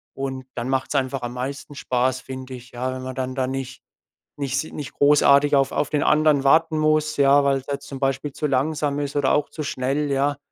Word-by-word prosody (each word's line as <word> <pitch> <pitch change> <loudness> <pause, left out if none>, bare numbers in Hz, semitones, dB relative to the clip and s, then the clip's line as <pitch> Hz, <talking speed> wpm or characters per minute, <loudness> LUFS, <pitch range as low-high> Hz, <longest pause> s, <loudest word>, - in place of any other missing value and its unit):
Und 135 -1 -4
dann 120 +1 -3
macht's 135 +2 -1
einfach 135 -1 0
am 120 0 -5
meisten 140 +3 -6
Spaß, 130 -1 0
finde 130 0 -8
ich, 125 0 -13
ja? 125 +2 -3
Wenn 130 - -6
man 130 0 -6
dann 130 0 -3
da 130 - 0
nicht 130 0 -5 0.6
nicht 140 -1 -2
si 155 - -5
nicht 145 -4 -7
großartig 145 0 +5
auf 135 0 +2
auf - - -1
den 150 - +1
anderen 150 -2 +3
warten 160 +3 +4
muss, 155 0 +2
ja, 140 0 +5
weil 140 -1 +2
er - - -13
halt 140 - -4
zum 135 -2 -8
Beispiel 135 +1 -1
zu 150 - -2
langsam 145 +1 0
ist 145 -1 -4
oder 145 -2 +2
auch 145 -1 +1
zu 155 - -7
schnell, 140 +1 -1
ja? 140 +1 +1
135 Hz, 225 wpm, -23 LUFS, 130-145 Hz, 0.6 s, großartig